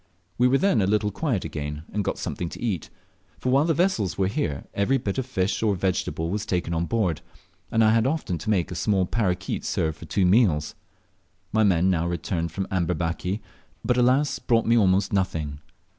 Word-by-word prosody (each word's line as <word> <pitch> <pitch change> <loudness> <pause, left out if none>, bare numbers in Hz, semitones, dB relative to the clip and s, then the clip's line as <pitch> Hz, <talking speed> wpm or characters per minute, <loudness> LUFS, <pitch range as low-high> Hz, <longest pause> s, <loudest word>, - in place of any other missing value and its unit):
We 125 - +5
were 130 +2 +4
then 185 - +2
a 95 - +1
little 105 0 +1
quiet 120 - -1
again, 75 0 -5
and 105 0 0
got - - -2
something 85 - -4
to - - -9
eat; 105 -10 -2 0.5
for 125 - -1
while 140 +3 +4
the 165 -2 +1
vessels 145 - +1
were 95 - +2
here 95 - -2
every 115 +7 +2
bit 105 -2 -2
of 130 - -3
fish 95 -6 -1
or 105 -3 +2
vegetable 90 -3 -1
was 105 +1 -2
taken 90 -3 -1
on 85 +1 -1
board, 100 -9 0 0.5
and 115 0 +3
I 110 - +5
had 115 +2 +3
often 135 - -2
to 95 - -5
make 95 -4 +1
a - - -3
small 95 +2 +1
parroquet 90 -4 -1
serve 80 -1 -1
for 85 - -11
two 90 +5 +1
meals. 90 -7 +3 0.8
My 110 - +2
men 95 -2 +3
now 85 -1 0
returned 85 -1 -2
from 95 +3 -3
Amberbaki, 90 +2 -1 0.4
but, 125 - +2
alas 130 +4 +2
brought 115 -2 +2
me 115 - +4
almost 95 -3 +3
nothing. 80 -7 -1
95 Hz, 200 wpm, -25 LUFS, 85-115 Hz, 0.8 s, We